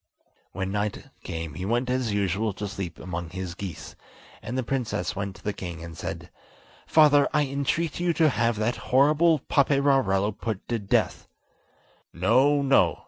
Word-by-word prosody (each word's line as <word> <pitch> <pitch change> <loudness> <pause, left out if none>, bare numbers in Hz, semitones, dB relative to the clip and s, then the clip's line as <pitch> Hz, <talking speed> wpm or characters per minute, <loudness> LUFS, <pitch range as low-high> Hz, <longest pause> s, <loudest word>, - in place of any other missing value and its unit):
When 95 +1 -3
night 105 0 -3
came 80 -2 -5
he 75 - -6
went 120 +5 0
as 125 -3 0
usual 100 +1 0
to 105 +1 -5
sleep 95 -4 -6
among 85 -2 -5
his 95 -1 -5
geese, 90 -2 -7 0.5
and 125 +3 -5
the 130 - 0
princess 120 -6 -2
went 100 -1 -4
to 85 - -16
the 105 - -2
king 85 -4 -7
and 85 -1 -8
said: 80 - -6 0.6
"Father, 145 -2 +5
I 150 -1 +3
entreat 140 +4 -1
you 175 0 +2
to 160 -1 +4
have 120 -3 +1
that 110 +3 -1
horrible 150 +4 +4
Paperarello 135 -8 +2
put 110 -1 -5
to 120 -1 0
death." 100 -1 0 0.9
"No, 130 +11 +3
no!" 100 - +3
110 Hz, 160 wpm, -26 LUFS, 95-135 Hz, 0.9 s, Father